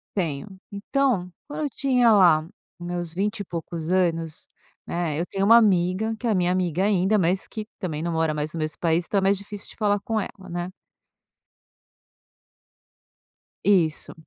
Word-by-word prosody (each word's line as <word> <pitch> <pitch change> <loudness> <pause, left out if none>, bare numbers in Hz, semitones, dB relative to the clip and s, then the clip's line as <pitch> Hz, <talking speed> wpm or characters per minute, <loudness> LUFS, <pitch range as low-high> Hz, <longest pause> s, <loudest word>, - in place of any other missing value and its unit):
Tenho. 185 +2 -3
Então, 205 -3 0 0.2
quando 300 +1 -4
eu 290 - -1
tinha 250 -4 +3
lá, 180 -7 +6 0.4
os 175 - -7
meus 175 -2 -4
vinte 205 +2 -1
e 200 - -2
poucos 165 -1 -5
anos, 165 -3 0 0.4
né, 165 -3 -2
eu 170 - -1
tenho 195 +1 -3
uma 230 +3 +8
amiga, 200 +1 +2
que 245 - -3
é - - +2
a 215 - +2
minha 180 -1 +2
amiga 180 -1 0
ainda, 200 +1 +3
mas 185 0 +1
que, 215 -1 -6
também, 160 -4 -3
não 170 - -1
mora 160 -1 +1
mais 150 +1 -3
no 165 - -4
mesmo 155 0 -3
país, 170 +1 +1
então, 205 - 0
é 195 - +3
mais 195 +1 +3
difícil 200 0 -8
de - - -12
falar 205 -2 +1
com 220 +1 -1
ela, - - -4 0.2
né. 175 +1 -4 2.9
Isso. 175 -6 +2
185 Hz, 175 wpm, -24 LUFS, 170-205 Hz, 2.9 s, uma